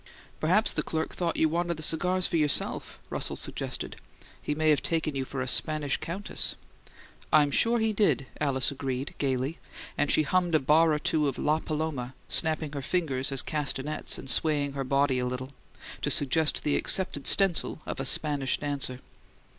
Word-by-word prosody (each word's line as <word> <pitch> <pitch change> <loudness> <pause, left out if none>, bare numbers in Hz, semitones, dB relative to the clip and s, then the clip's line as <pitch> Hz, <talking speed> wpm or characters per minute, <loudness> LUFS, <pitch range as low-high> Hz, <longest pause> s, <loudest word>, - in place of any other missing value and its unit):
"Perhaps 185 +8 +2
the - - 0
clerk 160 0 -3
thought 170 -2 -2
you 160 - +4
wanted 170 +1 -1
the 155 - -3
cigars 180 +4 +1
for - - -1
yourself," 150 -3 0
Russell - - -2
suggested. - - -4 0.4
"He 150 - -2
may 155 0 +3
have 145 - +2
taken 160 -3 -1
you 135 -1 -2
for 135 0 -5
a 130 - -3
Spanish 145 +4 0
countess." 190 +5 -2 0.8
"I'm 150 -2 +5
sure 230 +10 +3
he 220 -1 +1
did!" 155 - +2
Alice 135 -3 +1
agreed, 135 -1 -4
gaily; 135 +3 -1 0.4
and 145 0 +2
she 155 - +4
hummed 175 +2 +1
a - - +5
bar 155 +4 +4
or 150 - +2
two 150 0 +1
of 135 - -2
"LaPaloma," 150 -4 -2
snapping 155 -2 +1
her 140 -1 -4
fingers 135 -4 0
as 135 -1 +2
castanets, 150 0 -2
and - - -9
swaying 145 +2 +2
her 140 -1 -3
body 135 0 +1
a 125 - -1
little, 130 +2 -5 0.5
to - - 0
suggest 150 +2 +1
the 145 - +1
accepted 145 -7 +1
stencil 195 -5 +3
of - - -5
a 135 - -2
"Spanish 140 -1 +1
Dancer." 140 -3 -3
150 Hz, 175 wpm, -28 LUFS, 135-160 Hz, 0.8 s, I'm